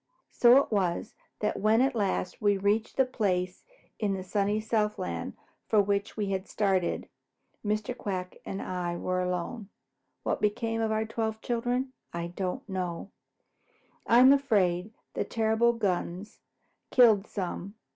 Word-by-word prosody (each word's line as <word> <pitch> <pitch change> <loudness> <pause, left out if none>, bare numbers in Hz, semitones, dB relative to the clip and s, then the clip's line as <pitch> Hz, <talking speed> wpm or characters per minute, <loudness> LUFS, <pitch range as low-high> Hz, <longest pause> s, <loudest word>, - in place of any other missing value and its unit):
So 245 +1 +6
it 280 - +2
was 190 -1 0 0.3
that 210 - 0
when 215 +2 +4
at 265 +1 +3
last 195 -4 -1
we 205 -1 +3
reached 205 +3 0
the 265 - +5
place 185 -7 -1 0.4
in 205 -3 0
the 190 - -5
sunny 205 +2 0
Southland 210 - -2 0.3
for 215 - +4
which 200 +1 0
we 205 -2 -1
had 190 0 -2
started, 190 -4 0 0.6
Mr. 215 +3 -1
Quack 185 -6 -4
and 195 - -5
I 175 -1 -3
were 185 +1 -1
alone. 180 +4 -3 0.5
What - - -1
became 225 +2 0
of 220 -1 0
our 220 0 0
twelve 220 0 -2
children 245 +2 -1 0.2
I 170 0 -4
don't 195 +8 -3
know. 185 -1 -4 1.0
I 235 - +5
am 260 +2 +8
afraid 205 -8 +1 0.2
the - - -1
terrible 225 +1 +2
guns 195 -2 -2 0.5
killed 220 -5 +5
some. 195 +1 -5
210 Hz, 145 wpm, -29 LUFS, 185-225 Hz, 1.0 s, am